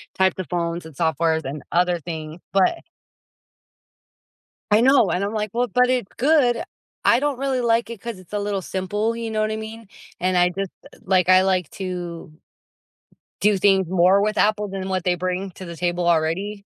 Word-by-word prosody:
types 190 -1 +2
of 185 - -4
phones 170 -1 -2
and 160 -3 -12
softwares 160 +1 0
and 140 +2 -5
other 175 0 +2
things, 160 0 -7
but 195 - +3 1.9
I 210 - +5
know, 255 -3 +5
and 180 - 0
I'm 205 - -3
like 215 -1 -2
well, 245 +1 +1
but 250 +1 +3
it's 250 -6 -1
good. 265 -3 +3 0.4
I 235 - +5
don't 290 -3 -1
really 270 -2 0
like 230 -1 +1
it 230 -4 -7
'cause 235 -4 -6
it's 185 0 -17
a 210 - -1
little 205 -1 -2
simple, 205 +5 -2
you 230 -1 -4
know 215 -1 -1
what 215 0 0
I 220 - -2
mean? 220 -1 -8 0.3
And 185 0 +1
I 180 0 +4
just, 195 +1 -4 0.3
like, 185 -1 +2
I 185 0 +7
like 185 -4 +1
to 175 -4 -6 1.1
do 210 -1 +3
things 190 -2 +3
more 185 +2 +4
with 215 +1 0
Apple 210 0 +2
than 195 -1 -5
what 185 -2 -1
they 180 - +2
bring 185 +2 -3
to 185 - -10
the 170 -1 -8
table 175 0 -1
already. 175 +5 0
190 Hz, 190 wpm, -22 LUFS, 175-215 Hz, 1.9 s, I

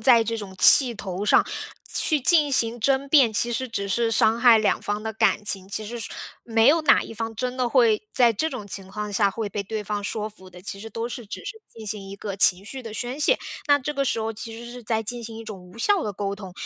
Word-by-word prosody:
在 230 0 +5
这 230 +1 -3
种 195 -3 -8
气 255 -4 +8
头 190 -2 -6
上， - - +4 0.5
去 310 -3 +2
进 300 +1 +4
行 235 -3 +1
争 275 +3 +1
辩， 270 -6 +5
其 235 +3 +1
实 260 +2 -2
只 200 -3 -4
是 230 +4 0
伤 220 +1 +2
害 240 -3 +7
两 215 - +1
方 205 +1 -3
的 220 0 -4
感 215 - +1
情。 195 -2 -4
其 215 +2 -4
实 240 +2 -6 0.5
没 225 +1 +3
有 325 +2 +4
哪 310 - +5
一 - - -9
方 225 0 -5
真 250 +3 -3
的 250 -2 0
会 230 -5 +3
在 240 -2 +4
这 315 +10 -1
种 205 - -7
情 195 -1 -5
况 210 +1 -5
下 200 -1 +2
会 220 0 -4
被 200 +1 -4
对 215 +2 -5
方 205 0 -3
说 215 0 -3
服 190 -3 -16
的， 180 0 -13
其 195 +1 -7
实 225 - -8
都 230 +2 -4
是 240 -2 -8
只 - - -8
是 445 -1 -7
进 220 -1 -12
行 200 -1 -5
一 195 - -7
个 200 -1 -6
情 190 -1 +4
绪 260 +5 -8
的 225 -3 -8
宣 245 +5 -5
泄。 - - +3 0.3
那 285 0 +5
这 295 +3 -4
个 275 -1 0
时 230 - 0
候 220 0 -2
其 225 +1 -8
实 235 0 -9
是 245 0 -10
在 225 0 -1
进 240 +2 -3
行 225 0 -7
一 225 - -9
种 210 -3 -8
无 180 +4 -15
效 400 - +2
地 210 - -3
沟 200 +1 -3
通， 190 -3 -10
225 Hz, 280 characters per minute, -24 LUFS, 205-245 Hz, 0.5 s, 气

